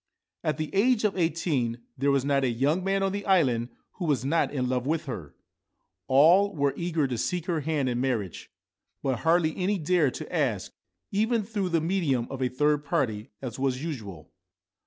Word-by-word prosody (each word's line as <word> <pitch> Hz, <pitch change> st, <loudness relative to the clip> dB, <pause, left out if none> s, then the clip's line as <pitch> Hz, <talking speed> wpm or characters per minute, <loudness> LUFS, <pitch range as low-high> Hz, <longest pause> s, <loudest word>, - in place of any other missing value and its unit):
At 155 Hz, -, 0 dB
the 155 Hz, -1 st, -4 dB
age 225 Hz, +3 st, +3 dB
of 210 Hz, -2 st, +1 dB
eighteen 150 Hz, -9 st, 0 dB
there 140 Hz, +2 st, +1 dB
was 140 Hz, -1 st, +2 dB
not 140 Hz, -1 st, +2 dB
a 130 Hz, -, +2 dB
young 140 Hz, +10 st, +1 dB
man 195 Hz, +1 st, +1 dB
on 195 Hz, -, +1 dB
the 200 Hz, +1 st, -3 dB
island 130 Hz, -11 st, +3 dB, 0.3 s
who 180 Hz, -, -3 dB
was 135 Hz, -6 st, 0 dB
not 165 Hz, +4 st, +1 dB
in 130 Hz, -3 st, -1 dB
love 125 Hz, 0 st, -1 dB
with 160 Hz, +1 st, 0 dB
her. 100 Hz, -, -7 dB, 0.7 s
All 175 Hz, +9 st, +5 dB
were 140 Hz, -2 st, +1 dB
eager 170 Hz, -3 st, 0 dB
to 125 Hz, -3 st, -3 dB
seek 175 Hz, +3 st, -1 dB
her 170 Hz, -4 st, 0 dB
hand 150 Hz, -2 st, -1 dB
in 120 Hz, -1 st, -1 dB
marriage; 115 Hz, -9 st, -2 dB, 0.5 s
but 130 Hz, -4 st, 0 dB
hardly 165 Hz, -1 st, +2 dB
any 195 Hz, +2 st, 0 dB
dared 160 Hz, -5 st, +1 dB
to -, -, -6 dB
ask, -, -, 0 dB, 0.4 s
even 220 Hz, +2 st, +1 dB
through 200 Hz, -3 st, -2 dB
the 165 Hz, -2 st, +1 dB
medium 160 Hz, -8 st, 0 dB
of 135 Hz, -1 st, -5 dB
a 125 Hz, -, +1 dB
third 150 Hz, +3 st, +1 dB
party, 130 Hz, -9 st, -1 dB
as 125 Hz, -1 st, -5 dB
was 130 Hz, 0 st, -1 dB
usual. 105 Hz, -, -6 dB
150 Hz, 190 wpm, -27 LUFS, 130-180 Hz, 0.7 s, All